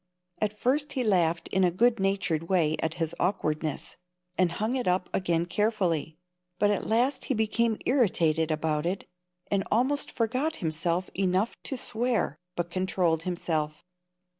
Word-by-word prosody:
] 180 0 -51
At 210 0 0
first 285 +5 +1
he 260 -3 0
laughed 175 -6 +2
in 190 - +2
a 180 - +5
good 230 +6 +2
natured 185 -4 0
way 165 -5 +3
at 160 0 -1
his 165 -1 -1
awkwardness, 155 -5 -1 0.4
and 180 -2 +2
hung 220 +7 -1
it 250 -5 -1
up 180 0 +1
again 170 -3 +1
carefully; 180 -6 0 0.4
but 205 +1 +3
at 205 - -1
last 250 +5 +2
he 265 - 0
became 220 +1 +1
irritated 170 - +2
about 155 0 0
it, 190 +3 -2 0.5
and 200 -1 +2
almost 265 +6 +1
forgot 255 +8 0
himself 170 +2 -1
enough 190 +3 +1
to 265 - -3
swear, 235 - -1 0.2
but 175 0 -3
controlled 180 -3 +1
himself. 160 -2 -2
185 Hz, 155 wpm, -28 LUFS, 165-225 Hz, 0.5 s, a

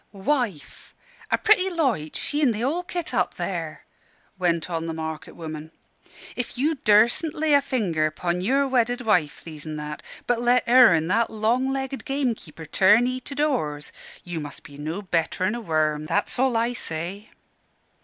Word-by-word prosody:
"Wife! 205 - -3 0.3
a - - +3
pretty 385 -3 +4
loitch, 260 - -1
she 295 +1 -1
an' 260 -6 +4
the 215 - -4
whole 295 +8 0
kit, 350 -1 -4
up - - 0
there!" - - -4 0.5
went 170 -2 +1
on 165 -2 -3
the 165 - -3
market 160 -1 -6
woman. 155 -2 -7 0.7
"If 245 -1 -4
you 295 +6 +2
durstn't 230 +9 +4
lay 300 -2 +3
finger 180 - 0
'pon 175 +3 -2
your 270 +8 +2
wedded 245 -1 +1
wife, 180 -10 +1
These 155 -2 -9
an' 155 - -4
That, 150 0 -6 0.2
but 245 -1 +1
let 245 +1 +3
her 245 -3 +8
an' 160 -1 +2
that 230 +4 +2
long 235 +5 +1
legged 270 0 -3
gamekeeper 245 - -3
turn'ee 230 +10 +4
to 280 - -7
doors, 240 - -1 0.3
you 175 -2 -5
must 145 -1 -8
be 140 - -13
no 155 +7 -5
better'n 185 +2 0
a 240 - -4
worm, 155 -4 0
that's 205 +8 -1
all 260 -3 +3
I 235 +2 +1
say." 185 +1 -5
215 Hz, 165 wpm, -24 LUFS, 160-260 Hz, 0.7 s, her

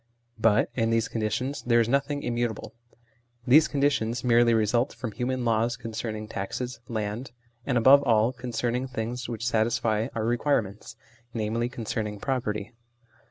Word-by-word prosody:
But 110 -1 +3
in 115 -2 0
these 115 -1 +1
conditions 120 +5 -2
there 120 -1 +3
is 115 - +2
nothing 140 +3 0
immutable; 120 -2 -2 0.7
these 150 +5 +6
conditions 135 -5 0
merely 120 -1 +4
result 115 +4 +1
from 115 -4 -5
human 125 +2 -2
laws 115 +1 +1
concerning 110 -2 -5
taxes, 115 +4 -5
land, 110 +2 -3 0.4
and, 130 -3 +2
above 135 +4 +7
all, 115 -2 +3
concerning 125 +1 -2
things 125 +1 -4
which 115 -1 -4
satisfy 115 -1 +1
our 110 -1 -1
requirements, 115 -4 -1 0.4
i.e. 115 +2 -1
concerning 110 -3 -4
property. 110 -5 -2
115 Hz, 135 wpm, -27 LUFS, 110-125 Hz, 0.7 s, above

